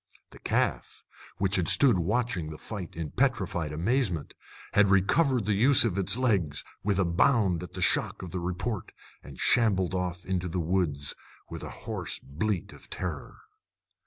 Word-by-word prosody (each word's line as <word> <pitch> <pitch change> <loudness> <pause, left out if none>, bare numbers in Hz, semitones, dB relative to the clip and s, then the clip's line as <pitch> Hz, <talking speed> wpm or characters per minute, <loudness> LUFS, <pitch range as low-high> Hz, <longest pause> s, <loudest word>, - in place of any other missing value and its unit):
The - - -14
calf, - - -1 0.3
which 100 0 +1
had 90 - 0
stood 125 -10 +5
watching 100 -2 -1
the 80 - -8
fight 100 -3 -7
in 80 -3 -5
petrified 95 - 0
amazement, 90 - -1 0.4
had 105 -1 +5
recovered 120 - +3
the 105 - +1
use 120 +6 +5
of 105 -6 0
its 100 +2 +2
legs 95 - +1 0.2
with 100 -1 +1
a 95 - +2
bound 90 0 +2
at 90 0 -9
the 95 0 -2
shock - - +1
of 90 - -7
the 90 - -3
report, 90 +4 -4 0.3
and - - -12
shambled 100 -6 +2
off 90 -1 -3
into 90 -1 -1
the 90 +2 -2
woods 80 -5 -1 0.4
with - - -6
a - - -6 0.2
hoarse - - -3
bleat 90 +7 -3
of - - -13
terror. 85 -6 -5
95 Hz, 165 wpm, -28 LUFS, 85-110 Hz, 0.4 s, stood